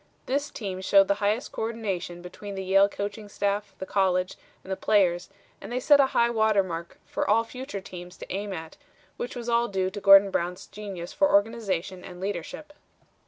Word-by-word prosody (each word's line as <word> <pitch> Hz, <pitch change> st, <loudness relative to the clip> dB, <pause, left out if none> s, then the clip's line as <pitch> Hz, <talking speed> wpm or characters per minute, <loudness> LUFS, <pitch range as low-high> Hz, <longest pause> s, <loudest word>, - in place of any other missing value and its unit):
This 285 Hz, +3 st, -1 dB
team 190 Hz, -5 st, -5 dB
showed 195 Hz, 0 st, +5 dB
the -, -, +4 dB
highest 210 Hz, +4 st, 0 dB
co -, -, -5 dB
ordination 195 Hz, -6 st, -3 dB
between 200 Hz, +3 st, -8 dB
the 190 Hz, -, -4 dB
Yale 195 Hz, +1 st, +5 dB
coaching 205 Hz, +1 st, -5 dB
staff, 200 Hz, 0 st, -2 dB
the 190 Hz, -, -5 dB
college, 185 Hz, -1 st, +1 dB, 0.3 s
and 190 Hz, -, -9 dB
the -, -, +1 dB
players, 185 Hz, -4 st, +2 dB, 0.3 s
and -, -, -8 dB
they 250 Hz, -, 0 dB
set 285 Hz, +2 st, +5 dB
a 275 Hz, -, +6 dB
high 235 Hz, -2 st, +2 dB
water 220 Hz, -3 st, +3 dB
mark 170 Hz, -2 st, -6 dB
for -, -, -2 dB
all 225 Hz, +2 st, +4 dB
future 250 Hz, -3 st, -7 dB
teams 180 Hz, -1 st, -10 dB
to -, -, -7 dB
aim 200 Hz, +1 st, -3 dB
at, 160 Hz, -3 st, -7 dB, 0.4 s
which 245 Hz, -, -5 dB
was 240 Hz, -1 st, -6 dB
all 235 Hz, 0 st, +2 dB
due 190 Hz, -2 st, -1 dB
to 205 Hz, +1 st, -7 dB
Gordon 195 Hz, 0 st, +8 dB
Brown's 180 Hz, +1 st, -2 dB
genius 195 Hz, -4 st, -7 dB
for 290 Hz, -, +3 dB
organization 200 Hz, -4 st, 0 dB
and 180 Hz, -1 st, -10 dB
leadership." 205 Hz, -, -5 dB
200 Hz, 195 wpm, -27 LUFS, 185-220 Hz, 0.4 s, Gordon